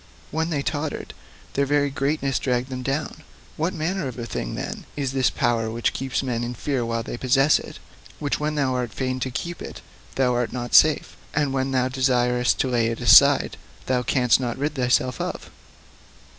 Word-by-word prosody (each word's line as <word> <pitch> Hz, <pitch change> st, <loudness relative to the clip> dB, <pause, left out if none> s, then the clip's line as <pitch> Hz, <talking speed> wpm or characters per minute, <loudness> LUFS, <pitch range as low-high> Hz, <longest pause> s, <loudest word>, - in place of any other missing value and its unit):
When 160 Hz, +2 st, -1 dB
they 145 Hz, -4 st, -1 dB
tottered, 150 Hz, +1 st, -3 dB, 0.4 s
their 140 Hz, 0 st, +1 dB
very 145 Hz, 0 st, +2 dB
greatness 135 Hz, -1 st, 0 dB
dragged 125 Hz, 0 st, -1 dB
them 130 Hz, -1 st, -5 dB
down. 135 Hz, +4 st, -3 dB, 0.3 s
What 165 Hz, +4 st, -1 dB
manner 170 Hz, 0 st, -2 dB
of 125 Hz, -, -6 dB
thing, -, -, -4 dB
then, -, -, -5 dB
is 140 Hz, -3 st, -2 dB
this 130 Hz, -1 st, +3 dB
power 115 Hz, -2 st, 0 dB
which 115 Hz, +1 st, -1 dB
keeps 135 Hz, 0 st, -2 dB
men 120 Hz, -3 st, -2 dB
in 120 Hz, +1 st, -4 dB
fear 135 Hz, +1 st, -1 dB
while 115 Hz, 0 st, -2 dB
they 120 Hz, -, -6 dB
possess 135 Hz, +4 st, +3 dB
it -, -, -10 dB, 0.4 s
which 145 Hz, -1 st, -2 dB
when 150 Hz, +1 st, -1 dB
thou 135 Hz, -3 st, +1 dB
art 125 Hz, -3 st, -2 dB
fain 130 Hz, -1 st, -2 dB
to 130 Hz, -, -2 dB
keep, 170 Hz, +7 st, -5 dB, 0.5 s
thou 130 Hz, -2 st, +2 dB
art 120 Hz, -1 st, -1 dB
not 120 Hz, -1 st, -5 dB
safe, 155 Hz, -1 st, +5 dB, 0.2 s
and 145 Hz, -2 st, +1 dB
when 135 Hz, 0 st, 0 dB
thou 130 Hz, -1 st, +1 dB
desirest 125 Hz, -2 st, +2 dB
to -, -, 0 dB
lay 120 Hz, -3 st, +1 dB
it 115 Hz, 0 st, -3 dB
aside 110 Hz, -6 st, +6 dB, 0.3 s
thou 125 Hz, -1 st, +1 dB
canst 125 Hz, -1 st, +3 dB
not 120 Hz, -3 st, -3 dB
rid 145 Hz, +3 st, -1 dB
thyself 125 Hz, -2 st, +1 dB
of? -, -, -5 dB
130 Hz, 185 wpm, -24 LUFS, 125-145 Hz, 0.5 s, aside